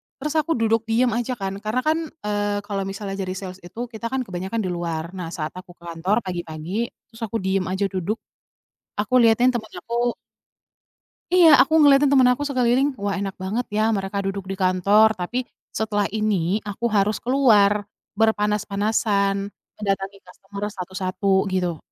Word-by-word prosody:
terus 295 +2 -4
aku 325 +2 0
duduk 225 -1 +1
diam 240 +2 +2
aja 240 +3 -1
kan, 195 -2 -4
karena 215 +4 -1
kan, 310 +1 +2 0.3
eee, 205 0 -1
kalau 195 -1 -3
misalnya 195 0 -5
jadi 185 -1 -2
sales 190 -1 -7
itu 230 +7 -7
kita 230 0 -5
kan 260 +2 -2
kebanyakan 190 +2 -3
di 185 - -2
luar. 170 -1 -3
Nah 180 -2 -4
saat 155 -2 -3
aku 180 -1 -14
ke 170 - -23
kantor 170 +4 -1
pagi-pagi, 175 +4 -3 0.2
terus 225 - -15
aku 225 - -2
diam 190 0 0
aja 190 +2 0
duduk. 190 +2 -1 0.8
Aku 210 +5 +2
lihatin 235 +1 +5
temen 230 -3 -5
aku 240 +1 -1 1.2
Iya, 355 -3 +8
aku 315 - +2
ngeliatin 285 -1 +6
temen 265 -2 +6
aku 250 - -7
sekeliling, 255 0 +2 0.2
wah 200 -1 0
enak 195 -1 -3
banget 220 +6 -1
ya 215 - +3
mereka 195 +1 -4
duduk 195 0 -3
di 195 - -4
kantor, 200 +4 +5
tapi 240 +8 -2 0.2
setelah 210 -2 -1
ini 200 -3 +1
aku 205 +4 -4
harus 210 0 +1
keluar, 210 -6 +4 0.3
berpanas-panasan, 210 -1 +1 0.4
mendatangi 195 -1 -2
customer 195 +2 -9
satu-satu 185 +1 -4 0.3
gitu. 180 -3 0
205 Hz, 160 wpm, -23 LUFS, 190-230 Hz, 1.2 s, Iya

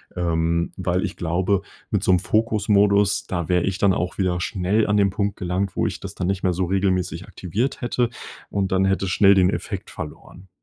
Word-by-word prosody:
ähm, 85 -1 0
weil 90 -1 0
ich - - -4
glaube, 90 +3 0 0.3
mit - - 0
so - - +3
'nem 90 - +4
Fokus-Modus, 105 -1 +2
da 85 -3 -3
wäre 90 -1 +2
ich 95 -1 -1
dann 100 -2 +4
auch 90 +1 -2
wieder 90 -2 0
schnell 100 +3 0
an 105 0 +2
den 100 -1 +4
Punkt 100 +1 -2
gelangt, 95 0 -2
wo - - +1
ich - - -5
das - - -8
dann 90 - -2
nicht 95 0 -1
mehr 90 - +2
so 90 +1 -1
regelmäßig 95 -2 0
aktiviert 110 +11 -3
hätte 120 0 0 0.4
und 100 -2 -1
dann 95 0 +3
hätte 95 0 +1
es 90 - -2
schnell 100 +1 +6
den 90 -1 +4
Effekt - - -4
verloren. 90 +4 -9
95 Hz, 210 wpm, -23 LUFS, 90-100 Hz, 0.4 s, schnell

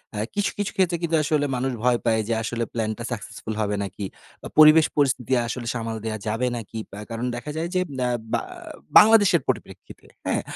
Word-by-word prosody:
আ - - -4 0.2
কিছু, 205 - +1
কিছু 205 -1 -2
ক্ষেত্রে 180 -2 +2
কিন্তু 165 -1 +1
আসলে 145 0 +1
মানুষ 130 +1 -1
ভয় 125 -1 +3
পায় 110 -1 +2
যে - - +2
আসলে 115 +1 -2
প্ল্যানটা 110 0 -2
successful 110 0 -6
হবে 105 -1 0
নাকি? 100 +1 -5 0.4
বা - - -7
পরিবেশ 155 +1 +8
পরিস্থিতি 130 -3 +1
আসলে 120 -1 -5
সামাল 115 -1 -3
দেওয়া 110 -1 -3
যাবে 115 +4 0
নাকি। 110 0 -7 0.2
আ - - -6
কারণ 115 +2 -3
দেখা 120 +5 -6
যায় 165 +1 -2
যে 185 - +3 0.2
ব্যা 125 -1 +1 0.2
বা - - +2 0.6
বাংলাদেশের 205 -7 +6
পরিপ্রেক্ষিতে - - -5 0.2
হ্যাঁ, - - +1
125 Hz, 190 wpm, -24 LUFS, 115-155 Hz, 0.6 s, পরিবেশ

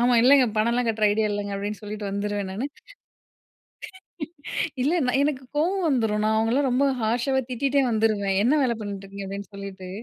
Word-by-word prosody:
ஆமா. 245 0 +4
இல்லைங்க 265 +1 +6
பணம்லாம் 235 +3 +2
கட்டுற 220 -1 0
ஐடியா 215 +1 +1
இல்லங்க 205 0 -3
அப்படின்னு 205 +1 -4
சொல்லிட்டு 210 0 -5
வந்துருவேன் 200 -1 -2
நானு. 225 +8 -3 2.2
இல்ல 290 +6 +2
நான் 265 +2 +2
எனக்கு 280 -3 -1
கோவம் 360 +4 +1
வந்துடும் 220 -6 +1
நான் 220 0 +2
அவங்களலாம் 245 +5 +2
ரொம்ப 265 +3 +3 0.2
ஹார்ஷாவே 245 +4 +1
திட்டிட்டே 275 +3 +1
வந்துருவேன், 215 -3 +1
என்ன 255 +6 +4
வேல 235 -3 +1
பண்ணிட்டு 200 -1 -6
இருக்கீங்க? 200 0 -7
அப்படின்னு 200 +1 -7
சொல்லிட்டு. 195 -2 -8
220 Hz, 160 wpm, -25 LUFS, 205-255 Hz, 2.2 s, இல்லைங்க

